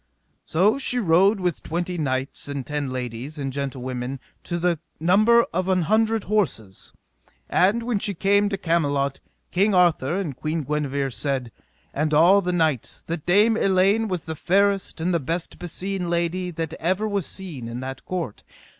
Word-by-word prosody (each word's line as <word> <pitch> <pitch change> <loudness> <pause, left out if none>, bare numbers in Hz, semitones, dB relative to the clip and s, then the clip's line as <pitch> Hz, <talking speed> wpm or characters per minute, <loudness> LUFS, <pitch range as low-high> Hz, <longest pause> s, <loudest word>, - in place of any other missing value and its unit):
So 200 +10 +2
she 250 -2 +1
rode 195 0 +4
with 180 -4 -1
twenty 175 +2 -3
knights, 135 -5 -2
and 140 -2 -4
ten 145 -2 -3
ladies, 125 +3 -5
and 135 -2 -3
gentlewomen, 130 -1 -4 0.3
to 175 - -2
the 175 -2 +1 0.2
number 215 +8 +5
of 185 +2 -1
an 185 -2 +2
hundred 220 +4 +2
horses. 140 - -2 0.6
And 205 +6 +2
when 235 -3 0
she 200 0 -2
came 200 +3 +3
to 195 - -2
Camelot, 145 -6 0 0.3
King 195 +2 +2
Arthur 175 -2 +3
and 160 -9 -3
Queen 155 +3 -2
Guenever 140 -2 -1
said, 125 +1 -2 0.4
and 150 +1 0
all 180 +6 +6
the 180 -1 -1
knights, 160 -8 0
that 165 -1 -5
Dame 210 +5 +5
Elaine 195 +2 +3
was 185 -4 -3
the 160 - -4
fairest 195 +3 +1
and 175 +3 0
the 170 - +2
best 165 +5 -4
beseen 180 +1 -3
lady 175 +2 -1
that 165 -2 -4
ever 190 +6 0
was 200 -5 -1
seen 160 -11 -6
in 115 +1 -5
that 130 0 -6
court. 170 - -4
170 Hz, 165 wpm, -24 LUFS, 140-195 Hz, 0.6 s, all